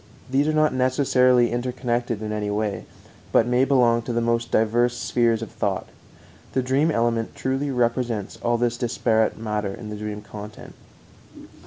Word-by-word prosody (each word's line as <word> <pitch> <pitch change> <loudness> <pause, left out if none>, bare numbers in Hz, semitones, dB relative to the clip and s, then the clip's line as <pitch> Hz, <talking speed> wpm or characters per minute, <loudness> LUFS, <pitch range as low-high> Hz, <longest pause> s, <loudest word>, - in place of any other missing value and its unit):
These 140 +3 +2
are - - +2
not 155 -1 +2
necessarily 125 -1 +3
interconnected 120 -2 -2
in 105 - -3
any 105 -1 -2
way, 105 0 -2 0.5
but - - +4
may 125 +2 +2
belong 120 -4 +3
to 120 - -5
the 120 - 0
most 115 0 0
diverse 120 +2 +2
spheres 115 -2 +1
of - - -8
thought. 105 -4 -2 0.7
The 130 - +1
dream 135 +5 +2
element 115 -4 0
truly 135 +2 -1
represents 120 -4 -1
all 120 0 +1
this 120 0 0
disparate 115 -2 +1
matter 105 -3 -3
in 105 -2 -8
the - - -4
dream 105 0 -6
content. 105 0 -10
120 Hz, 160 wpm, -23 LUFS, 110-125 Hz, 0.7 s, but